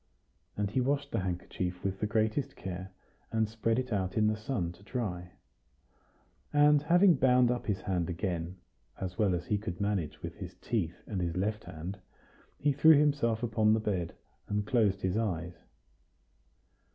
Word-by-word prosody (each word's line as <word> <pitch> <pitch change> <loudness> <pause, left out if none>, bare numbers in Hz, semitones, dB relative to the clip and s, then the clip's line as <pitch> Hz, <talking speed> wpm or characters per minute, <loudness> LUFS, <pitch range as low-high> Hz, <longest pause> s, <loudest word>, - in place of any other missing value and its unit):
And 100 -1 -1
he 130 - +1
washed 140 +2 0
the 115 - 0
handkerchief 90 0 -3
with 95 0 -2
the 105 - 0
greatest 110 +5 0
care, 95 0 -6 0.4
and 110 -1 +1
spread 115 +1 0
it 130 -3 -1
out 95 -1 -1
in 110 - +4
the 110 0 +2
sun 105 -5 -2
to 90 - -16
dry. 95 -6 -4 1.2
And 145 0 +5
having 175 +5 +5
bound 125 -3 +4
up 125 - -3
his 100 -3 -1
hand 90 -4 -1
again, 90 -1 -3 0.4
as 90 -1 -5
well 100 -4 +3
as 85 0 -4
he 105 +2 0
could 90 -3 -5
manage 100 -7 -2
with - - -6
his - - -8
teeth 95 -8 -2
and 95 -4 -3
his 85 0 -2
left 105 +3 -1
hand, 90 +6 -7 0.6
he 145 +1 +2
threw 150 +2 +7
himself 140 -6 +2
upon 110 -2 +3
his 110 - -2
bed, 90 -6 -2 0.3
and 105 0 -1
closed 105 -5 +2
his 95 +2 +1
eyes. 90 -6 -1
105 Hz, 170 wpm, -31 LUFS, 90-120 Hz, 1.2 s, threw